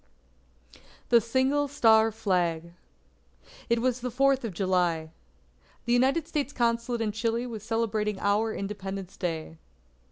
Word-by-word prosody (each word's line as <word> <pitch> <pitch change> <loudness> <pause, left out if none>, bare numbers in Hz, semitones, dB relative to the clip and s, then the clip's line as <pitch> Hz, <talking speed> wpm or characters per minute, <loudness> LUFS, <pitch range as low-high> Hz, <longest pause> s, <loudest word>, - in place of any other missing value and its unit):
THE 235 -1 +6
SINGLE 260 +5 +1
STAR 225 -5 +4
FLAG 175 -6 -1 1.0
It 235 0 +1
was 255 -1 +1
the 250 - -2
Fourth 270 +2 +2
of 225 - -3
July. 175 -3 0 0.7
The 240 - +1
United 270 +6 +2
States 290 -3 -2
Consulate 235 0 0
in 215 -2 0
Chile 230 +3 -1
was 225 -4 -6
celebrating 215 -2 -1
our 210 +2 +1
Independence 195 -2 -5
Day. 160 -3 -4
225 Hz, 125 wpm, -27 LUFS, 195-245 Hz, 1.0 s, THE